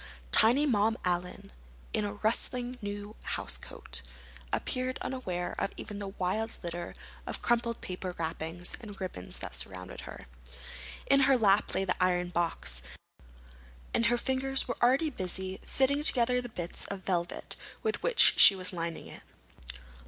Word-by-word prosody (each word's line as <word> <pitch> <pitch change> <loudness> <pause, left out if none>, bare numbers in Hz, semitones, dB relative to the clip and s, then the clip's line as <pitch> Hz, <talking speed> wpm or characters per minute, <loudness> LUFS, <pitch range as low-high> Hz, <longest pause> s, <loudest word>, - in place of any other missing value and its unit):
Tiny 250 +7 +5
Mom 225 -4 +2
Allen, 180 0 -2 0.4
in 105 - 0
a 100 - -3
rustling 245 - 0
new 205 +1 -6 0.2
housecoat, - - -4 0.5
appeared 255 0 -1
unaware 185 -9 -3
of - - 0
even 205 -1 -6
the 200 - -4
wild 195 +3 -2
litter 175 0 -5 0.3
of - - -3
crumpled 235 -1 +1
paper 185 -1 -5
wrappings 165 +1 -3
and 205 -4 -9
ribbons 180 - -3
that - - -6
surrounded 90 +9 -5
her. - - -10 0.8
In 275 - +5
her 270 -1 +5
lap 205 -2 +3
lay 195 - +1
the 185 0 0
iron 180 -1 +1
box, 170 -1 -1 1.1
and 230 - +3
her 240 +1 +2
fingers 265 +1 +1
were 245 - -3
already 270 +6 +3
busy 190 -3 -2
fitting 280 +2 +1
together 250 -4 +5
the 245 - -7
bits 175 -6 -3
of 200 -1 -5
velvet 175 -2 -2 0.3
with 440 -1 0
which - - +6
she 200 - +11
was 185 0 -2
lining 170 -1 -4
it. - - -11
205 Hz, 145 wpm, -30 LUFS, 180-250 Hz, 1.1 s, she